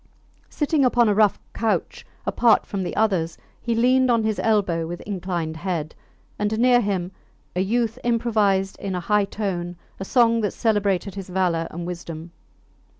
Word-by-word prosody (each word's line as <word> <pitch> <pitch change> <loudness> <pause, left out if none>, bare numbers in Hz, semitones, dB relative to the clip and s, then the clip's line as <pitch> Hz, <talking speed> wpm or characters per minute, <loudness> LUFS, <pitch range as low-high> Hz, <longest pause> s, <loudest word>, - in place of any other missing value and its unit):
Sitting 295 -1 +1
upon 245 -2 +4
a 210 - +3
rough 210 -1 +3
couch 225 -2 -2 0.2
apart 235 -2 +3
from 200 - -4
the 180 - -4
others, 185 -7 +1 0.2
he 235 -1 -1
leaned 255 +2 +3
on 230 -2 +3
his 220 -1 -1
elbow 185 -7 +1
with 175 +1 -6
inclined 175 -5 -3
head; 165 -3 -3 0.5
and 210 +1 0
near 245 +1 +5
him 190 -4 -2 0.4
a 180 - +1
youth 230 +4 0
improvised 215 -5 +1
in 195 -2 -3
a - - -1
high 210 +3 +2
tone 180 -4 -3 0.2
a - - -3
song 230 +2 +3
that 205 - -1
celebrated 205 -3 0
his 195 -1 -7
valour 175 -3 0
and 170 +1 -6
wisdom. 170 -2 -7
200 Hz, 160 wpm, -23 LUFS, 180-225 Hz, 0.5 s, near